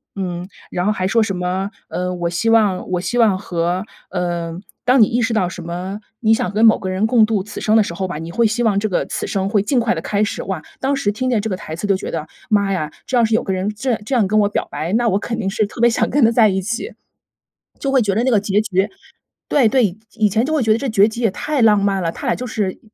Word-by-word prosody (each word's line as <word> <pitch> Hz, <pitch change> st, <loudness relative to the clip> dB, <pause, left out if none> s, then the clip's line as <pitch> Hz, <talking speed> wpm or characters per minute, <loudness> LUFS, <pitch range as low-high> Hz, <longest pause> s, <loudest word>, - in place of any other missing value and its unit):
嗯， 180 Hz, -2 st, -4 dB, 0.2 s
然 180 Hz, 0 st, -1 dB
后 -, -, +3 dB
还 185 Hz, -3 st, -1 dB
说 230 Hz, +4 st, +3 dB
什 195 Hz, -4 st, -2 dB
么， 185 Hz, +2 st, -2 dB, 0.2 s
呃， 180 Hz, 0 st, -2 dB
我 175 Hz, -1 st, -2 dB
希 170 Hz, +6 st, 0 dB
望 210 Hz, -5 st, +2 dB
我 180 Hz, -, +1 dB
希 180 Hz, +7 st, -2 dB
望 215 Hz, -5 st, +4 dB
和 175 Hz, 0 st, -2 dB, 0.2 s
呃 175 Hz, -2 st, -3 dB, 0.2 s
当 250 Hz, +1 st, +4 dB
你 -, -, +8 dB
意 240 Hz, +4 st, 0 dB
识 230 Hz, 0 st, 0 dB
到 215 Hz, -5 st, +1 dB
什 180 Hz, 0 st, -7 dB
么 180 Hz, +4 st, -5 dB, 0.2 s
你 220 Hz, -1 st, +3 dB
想 220 Hz, -, 0 dB
跟 215 Hz, +3 st, +3 dB
某 220 Hz, -, +6 dB
个 190 Hz, -, -5 dB
人 190 Hz, +4 st, +1 dB
共 225 Hz, -1 st, +5 dB
度 215 Hz, -3 st, -1 dB
此 210 Hz, +1 st, -8 dB
生 215 Hz, +1 st, +3 dB
的 -, -, +6 dB
时 170 Hz, -, -5 dB
候 185 Hz, +2 st, -3 dB
吧， 150 Hz, -, -4 dB
你 165 Hz, +2 st, -6 dB
会 230 Hz, +7 st, +1 dB
希 220 Hz, +2 st, 0 dB
望 215 Hz, -4 st, +2 dB
这 215 Hz, +2 st, 0 dB
个 185 Hz, -, 0 dB
此 -, -, -4 dB
生 195 Hz, -1 st, -1 dB
会 205 Hz, -2 st, +2 dB
尽 250 Hz, +4 st, +1 dB
快 230 Hz, -5 st, +1 dB
地 160 Hz, -, -4 dB
开 205 Hz, +4 st, -1 dB
始。 210 Hz, -, -1 dB
哇， 190 Hz, -5 st, -4 dB, 0.2 s
当 270 Hz, +1 st, +1 dB
时 205 Hz, -6 st, 0 dB
听 255 Hz, +4 st, -2 dB
见 240 Hz, -4 st, +2 dB
这 220 Hz, +2 st, -3 dB
个 190 Hz, -, -1 dB
台 160 Hz, -3 st, -7 dB
词 205 Hz, -, -3 dB
都 200 Hz, -, +3 dB
觉 185 Hz, -, -5 dB
得， 155 Hz, -2 st, -4 dB, 0.2 s
妈 200 Hz, -2 st, +2 dB
呀， 155 Hz, -5 st, -2 dB
这 260 Hz, -, -2 dB
要 240 Hz, -, +4 dB
是 225 Hz, 0 st, +1 dB
有 225 Hz, -, +3 dB
个 195 Hz, -, -2 dB
人 185 Hz, +2 st, -1 dB
这 255 Hz, +5 st, -2 dB
样 225 Hz, -, -1 dB
这 270 Hz, -, -3 dB
样 230 Hz, -6 st, +3 dB
跟 215 Hz, +3 st, +1 dB
我 205 Hz, -, +2 dB
表 -, -, -2 dB
白， 155 Hz, +4 st, -4 dB
那 235 Hz, +2 st, +2 dB
我 195 Hz, -3 st, +2 dB
肯 230 Hz, +2 st, -4 dB
定 195 Hz, -3 st, -1 dB
是 215 Hz, +2 st, 0 dB
特 210 Hz, -, -11 dB
别 235 Hz, +1 st, +5 dB
想 230 Hz, -, 0 dB
跟 280 Hz, -2 st, +4 dB
他 -, -, +5 dB
在 225 Hz, -2 st, +5 dB
一 190 Hz, 0 st, 0 dB
起， 240 Hz, -, -4 dB, 0.9 s
就 275 Hz, -, -2 dB
会 265 Hz, -2 st, +4 dB
觉 205 Hz, -3 st, +1 dB
得 220 Hz, +5 st, +1 dB
那 -, -, +3 dB
个 220 Hz, -, +4 dB
结 205 Hz, 0 st, +1 dB
局 195 Hz, -2 st, 0 dB, 0.6 s
对 265 Hz, -7 st, +4 dB
对， 215 Hz, -6 st, +2 dB, 0.2 s
以 215 Hz, -2 st, +3 dB
前 220 Hz, +5 st, +1 dB
就 310 Hz, -, -2 dB
会 310 Hz, -, +2 dB
觉 220 Hz, -1 st, +4 dB
得 -, -, +1 dB
这 270 Hz, +2 st, -3 dB
结局 220 Hz, +2 st, +2 dB
也 225 Hz, -4 st, +2 dB
太 295 Hz, +6 st, -2 dB
浪 215 Hz, -2 st, +5 dB
漫 195 Hz, -2 st, +1 dB
了， 165 Hz, -, 0 dB
他 -, -, -7 dB
俩 -, -, +2 dB
就 250 Hz, -, -5 dB
是 205 Hz, -4 st, -2 dB
205 Hz, 315 characters per minute, -19 LUFS, 185-225 Hz, 0.9 s, 你